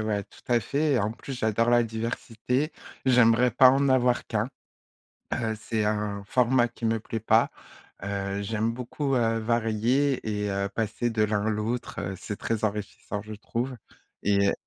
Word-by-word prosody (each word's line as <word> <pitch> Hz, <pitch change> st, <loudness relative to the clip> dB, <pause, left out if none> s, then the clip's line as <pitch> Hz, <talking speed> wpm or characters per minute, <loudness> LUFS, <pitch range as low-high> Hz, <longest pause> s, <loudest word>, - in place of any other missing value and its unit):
ouais, 105 Hz, -2 st, -1 dB
tout -, -, -19 dB
à 120 Hz, -1 st, +4 dB
fait, 145 Hz, +5 st, 0 dB
et 125 Hz, -, +3 dB
en 105 Hz, +2 st, 0 dB
plus, 135 Hz, +3 st, -7 dB
j'adore 110 Hz, +1 st, +1 dB
la 120 Hz, 0 st, +5 dB
diversité, 115 Hz, +5 st, -2 dB, 0.3 s
j'aimerais 125 Hz, -1 st, +5 dB
pas 125 Hz, +2 st, +7 dB
en 135 Hz, 0 st, +2 dB
avoir 125 Hz, -1 st, +3 dB
qu'1, 110 Hz, +2 st, -1 dB, 0.9 s
heu, 110 Hz, -1 st, -1 dB
c'est 110 Hz, -1 st, -1 dB
un 105 Hz, -1 st, -1 dB
format 125 Hz, 0 st, +3 dB
qui 115 Hz, -1 st, -5 dB
ne 115 Hz, -, +2 dB
me 115 Hz, -, -1 dB
plaît 115 Hz, +1 st, -4 dB
pas, 110 Hz, -, +4 dB, 0.5 s
heu, 100 Hz, 0 st, -2 dB
j'aime 110 Hz, +2 st, -1 dB
beaucoup, 130 Hz, +3 st, -2 dB
heu, 115 Hz, -2 st, +2 dB
varier 115 Hz, +4 st, +1 dB
et 105 Hz, -1 st, -1 dB
heu, 100 Hz, 0 st, -1 dB
passer 115 Hz, +2 st, -1 dB
de 110 Hz, -1 st, +1 dB
l'un 105 Hz, 0 st, +1 dB
à -, -, +2 dB
l'autre, 110 Hz, +3 st, -3 dB
heu, 95 Hz, -, -3 dB
c'est 105 Hz, -, -5 dB
très 110 Hz, -1 st, -2 dB
enrichissant 105 Hz, 0 st, -3 dB
je 110 Hz, +1 st, -8 dB
trouve 120 Hz, +4 st, -3 dB, 0.5 s
et 100 Hz, 0 st, +3 dB
115 Hz, 175 wpm, -27 LUFS, 105-125 Hz, 0.9 s, pas